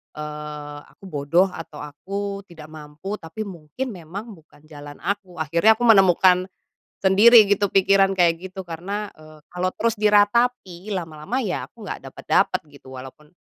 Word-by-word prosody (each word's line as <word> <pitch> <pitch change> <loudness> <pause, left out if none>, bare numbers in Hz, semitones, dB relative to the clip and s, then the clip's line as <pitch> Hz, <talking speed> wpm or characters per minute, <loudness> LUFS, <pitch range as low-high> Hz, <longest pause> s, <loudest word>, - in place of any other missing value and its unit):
eee, 150 -1 -7
aku - - -26
bodoh, 155 +6 +2
atau 160 -3 -9
aku 200 +7 -5
tidak 160 -3 -12
mampu, 155 +7 -7
tapi 165 +7 -8
mungkin 180 - -6
memang 195 +6 -8
bukan 155 -2 -22
jalan 145 -1 -11
aku. 200 -3 -4
Akhirnya 170 +8 +4
aku 245 - -3
menemukan 185 -3 +5 0.6
sendiri 215 +4 +7
gitu 205 0 +2
pikiran 195 0 +4
kayak 175 +1 +2
gitu. 190 0 -7
Karena, 195 +5 -5
eee, 155 0 -16
kalau 180 +1 -1
terus 230 0 0
diratapi, 210 -2 +2
lama-lama 165 +5 -4
ya 190 -5 -3
aku - - -14
nggak - - -6
dapet-dapet, - - 0
gitu. 130 -2 -13
Walaupun, 135 +4 -12
180 Hz, 145 wpm, -22 LUFS, 155-200 Hz, 0.6 s, sendiri